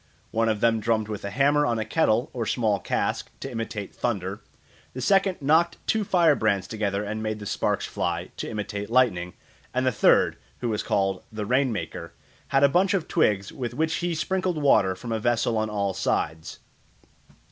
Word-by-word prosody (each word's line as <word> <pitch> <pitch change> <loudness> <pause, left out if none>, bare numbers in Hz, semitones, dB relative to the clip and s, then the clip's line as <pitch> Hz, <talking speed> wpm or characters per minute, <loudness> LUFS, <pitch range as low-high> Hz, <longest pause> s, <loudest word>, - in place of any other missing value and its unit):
One 115 0 +1
of 110 -2 -1
them 115 -1 +3
drummed 110 -1 0
with 105 -1 -5
a 100 - -3
hammer 140 +6 +3
on 120 -5 +1
a 110 - -2
kettle 120 -2 +1
or 115 -3 -3
small 110 -3 +1
cask - - -2
to - - -6
imitate 110 -3 -5
thunder; 100 -3 -3 0.5
the - - -4
second 195 +6 +2
knocked 160 +4 +3
two 220 -1 +1
fire 175 -5 +4
brands 100 -7 +1
together 105 -2 -2
and 110 +1 -4
made 110 -1 -2
the 105 - -8
sparks - - -1
fly, 85 +1 -3
to - - -4
imitate 105 -1 -4
lightning; 105 -8 +2 0.4
and 130 0 +1
the 130 - +3
third, 105 - +3 0.2
who 120 - -3
was 110 -1 -1
called 95 -3 0
"the 110 -1 -4
rain 130 +3 +2
maker," 85 -4 -5 0.3
had 135 0 +2
a - - +8
bunch 185 +7 +2
of 175 -4 -2
twigs 105 - +1
with 125 -7 -5
which 160 +1 0
he 175 -1 -1
sprinkled 185 +2 -1
water 105 -10 +4
from 120 +5 -7
a 110 - 0
vessel 120 0 +1
on 110 0 0
all 100 -2 -1
sides. 80 -2 -2
110 Hz, 190 wpm, -25 LUFS, 100-140 Hz, 0.5 s, a